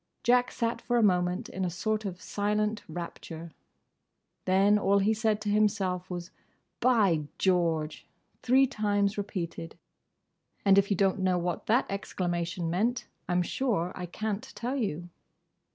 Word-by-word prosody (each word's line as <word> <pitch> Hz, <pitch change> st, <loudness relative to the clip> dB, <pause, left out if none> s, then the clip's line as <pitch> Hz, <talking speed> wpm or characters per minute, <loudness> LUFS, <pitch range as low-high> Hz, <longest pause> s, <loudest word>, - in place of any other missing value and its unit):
Jack 245 Hz, +1 st, +4 dB
sat 235 Hz, 0 st, -2 dB
for 240 Hz, -, 0 dB
a 235 Hz, -, +4 dB
moment 180 Hz, -2 st, +2 dB
in 190 Hz, -, -4 dB
a 180 Hz, -, 0 dB
sort 215 Hz, +5 st, -2 dB
of 185 Hz, -2 st, -4 dB
silent 210 Hz, +1 st, -1 dB
rapture. 165 Hz, 0 st, -7 dB, 0.9 s
Then 195 Hz, +3 st, +4 dB
all 200 Hz, 0 st, +3 dB
he 200 Hz, +2 st, +3 dB
said 220 Hz, -1 st, +1 dB
to 210 Hz, -, -2 dB
himself 200 Hz, -4 st, +1 dB
was 175 Hz, -1 st, -6 dB, 0.5 s
"By 200 Hz, -12 st, +3 dB
George!" 165 Hz, -4 st, 0 dB, 0.3 s
three 260 Hz, +2 st, +5 dB
times 205 Hz, -5 st, 0 dB
repeated; 170 Hz, -5 st, -5 dB, 0.9 s
and 195 Hz, 0 st, +7 dB
if 200 Hz, -, +1 dB
you 200 Hz, -, +1 dB
don't 195 Hz, 0 st, +2 dB
know 185 Hz, -1 st, +2 dB
what 175 Hz, -1 st, -3 dB
that 240 Hz, +4 st, +3 dB
exclamation 175 Hz, -3 st, -2 dB
meant, 220 Hz, +9 st, 0 dB, 0.2 s
I -, -, +1 dB
'm 180 Hz, 0 st, +3 dB
sure 190 Hz, -5 st, -1 dB
I 180 Hz, -1 st, -6 dB
can't 215 Hz, +7 st, -4 dB
tell 245 Hz, +3 st, -3 dB
you. 175 Hz, -, -2 dB
195 Hz, 150 wpm, -29 LUFS, 175-215 Hz, 0.9 s, and